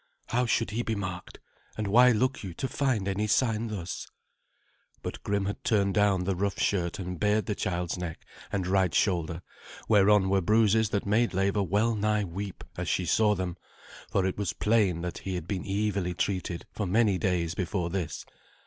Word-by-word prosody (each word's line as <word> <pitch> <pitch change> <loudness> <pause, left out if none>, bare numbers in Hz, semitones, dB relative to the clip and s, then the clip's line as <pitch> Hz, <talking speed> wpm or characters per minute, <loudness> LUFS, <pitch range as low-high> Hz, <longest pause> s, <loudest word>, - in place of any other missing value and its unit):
"How 125 +1 +1
should 115 -1 +1
he 115 +3 -1
be 115 -2 -2
marked? 95 -3 -6 0.4
And 110 - -2
why 120 +5 +6
look 130 +4 +1
you 90 -4 -6
to 130 - -2
find 130 -8 0
any 100 +2 0
sign 115 +1 +1
thus?" 95 -5 -5 1.0
But - - -5
Grim 100 -1 -1
had 100 - -4
turned 100 -3 +2
down 100 -2 +3
the 95 +1 0
rough 100 +2 -1
shirt 85 -4 0
and 90 -2 -5
bared 105 +1 +2
the 105 - -1
child's 90 -2 -2
neck 85 -2 -6 0.3
and 95 -2 -1
right 95 -2 +2
shoulder, 85 -3 0 0.4
whereon 105 -2 +5
were 95 0 +2
bruises 110 +2 +3
that 100 -2 -1
made 105 +1 +2
Leva 100 +2 +1
well 105 +5 +1
nigh 105 0 +1
weep 95 +1 -6
as - - -2
she 90 - 0
saw 105 +5 +3
them, 90 -2 -3 0.5
for 95 - +1
it 95 - -2
was 95 -5 -1
plain 100 -4 +2
that 90 -1 -4
he 95 -1 -4
had 90 -2 -5
been 95 0 -3
evilly 100 -3 -1
treated 90 -2 -2
for 105 - -3
many 100 -1 +3
days 90 -4 0
before 90 -1 -2
this. 85 -5 -3
100 Hz, 185 wpm, -28 LUFS, 90-105 Hz, 1.0 s, why